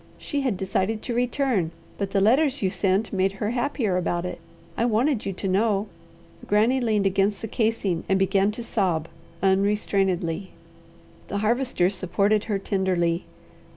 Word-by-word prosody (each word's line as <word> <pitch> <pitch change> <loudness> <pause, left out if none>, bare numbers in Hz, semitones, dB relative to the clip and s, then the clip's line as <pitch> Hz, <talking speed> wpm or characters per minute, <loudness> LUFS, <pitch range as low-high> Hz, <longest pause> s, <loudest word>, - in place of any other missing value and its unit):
She 285 - -3
had 250 -8 0
decided 195 +3 -1
to 245 - -3
return, 245 - +1 0.3
but 200 -1 -1
the 195 0 +1
letters 265 +5 +3
you 190 - +2
sent 195 +3 0
made 190 0 +1
her 210 +2 -2
happier 240 -6 0
about 175 -1 -1
it. 180 - -5 0.4
I - - 0
wanted 235 +1 +1
you 195 - -2
to 195 - -4
know." 200 +1 +1 0.6
Granny 225 +6 +3
leaned 215 -4 +1
against 195 +1 +1
the 225 - -5
casing, 215 -6 0
and 190 - +4
began 195 +1 +2
to 235 - -6
sob 180 -8 0 0.3
unrestrainedly. 190 -2 +1 0.7
The 200 - -3
Harvester 215 -3 +1
supported 200 +3 +1
her 210 -3 0
tenderly. 185 -3 0
200 Hz, 155 wpm, -25 LUFS, 190-225 Hz, 0.7 s, and